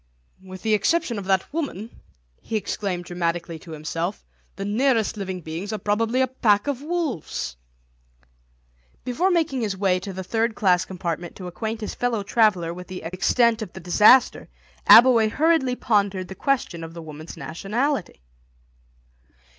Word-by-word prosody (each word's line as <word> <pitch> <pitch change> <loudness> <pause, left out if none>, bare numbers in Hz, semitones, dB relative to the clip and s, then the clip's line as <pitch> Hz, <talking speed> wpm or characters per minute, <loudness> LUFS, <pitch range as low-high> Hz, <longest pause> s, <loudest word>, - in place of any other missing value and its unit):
"With 185 0 -10
the 220 -1 +2
exception 240 - +1
of 195 - -7
that 190 +6 0
woman," 240 - -5 0.4
he 225 - -5
exclaimed 195 -4 -3
dramatically 170 -1 -3
to 165 - -15
himself, 165 +5 -4 0.3
"the 195 - -5
nearest 225 +1 +1
living 190 -3 -5
beings 165 +6 -5
are 215 - -2
probably 225 +5 0
a 260 - +3
pack 210 -5 +2
of 280 -2 -2
wolves." 300 - -3 1.5
Before 275 +10 0
making 320 -8 +1
his 205 -4 -2
way 185 -2 +2
to 195 +2 -7
the 190 0 -6
third 225 +4 -1
class 185 -2 +2
compartment 175 -2 -5
to 185 - -9
acquaint 220 +5 -4
his 210 - -4
fellow 235 -4 -1
traveller 200 -6 +2
with 180 +1 -9
the 185 -2 -7
extent 225 +7 +2
of 205 -5 -6
the 190 - -8
disaster 210 +8 +4 0.4
Abbleway 230 -2 +8
hurriedly 300 -2 +2
pondered 200 -6 0
the - - -6
question 215 - -1
of 165 +1 -9
the 170 - -7
woman's 155 +1 -10
nationality. 195 - -2
205 Hz, 155 wpm, -23 LUFS, 180-240 Hz, 1.5 s, Abbleway